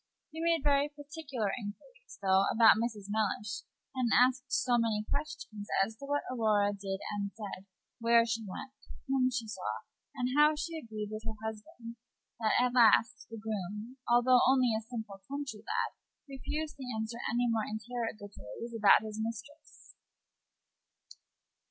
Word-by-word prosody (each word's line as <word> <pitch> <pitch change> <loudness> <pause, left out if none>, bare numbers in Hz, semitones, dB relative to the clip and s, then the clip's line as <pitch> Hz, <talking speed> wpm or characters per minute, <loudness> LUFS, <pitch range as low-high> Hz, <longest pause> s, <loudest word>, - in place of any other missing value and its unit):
He 320 +1 -6
made 335 -3 +2
very 285 0 +3
particular 290 -7 -4
inquiries, - - -10
though, 190 0 +4
about 225 0 +7
Mrs. 220 -4 -3
Mellish, 210 -2 -1 0.3
and 255 -2 0
asked 255 +1 +3
so 245 -2 +3
many 215 -2 0
questions 285 -8 -4 0.2
as 220 +2 -9
to 280 - -8
what 290 0 0
Aurora 210 -4 +2
did 195 -1 -4
and 200 -1 -2
said, 200 -3 -7 0.3
where 230 0 +5
she 225 -1 -1
went, 215 +6 -7 0.3
whom 265 -1 +3
she 240 -3 -3
saw, 215 - -4 0.3
and 250 -2 -1
how 300 +1 +6
she 330 +2 -4
agreed 220 -8 -5
with 215 0 -5
her 220 -1 -5
husband, 230 +2 -7 0.4
that 220 -2 +2
at 250 0 +2
last 225 -2 +4
the 225 - -7
groom, 210 +3 -5
although 245 +1 +6
only 255 -3 +4
a 220 - -1
simple 220 -4 -7
country 280 -5 -4
lad, 215 - -2 0.3
refused 295 +3 -4
to 270 - -7
answer 220 +2 -4
any 240 +1 +2
more 225 -2 0
interrogatories 220 - -6
about 210 -1 +6
his 215 0 -6
mistress. 230 +7 -8
230 Hz, 150 wpm, -32 LUFS, 215-265 Hz, 0.4 s, about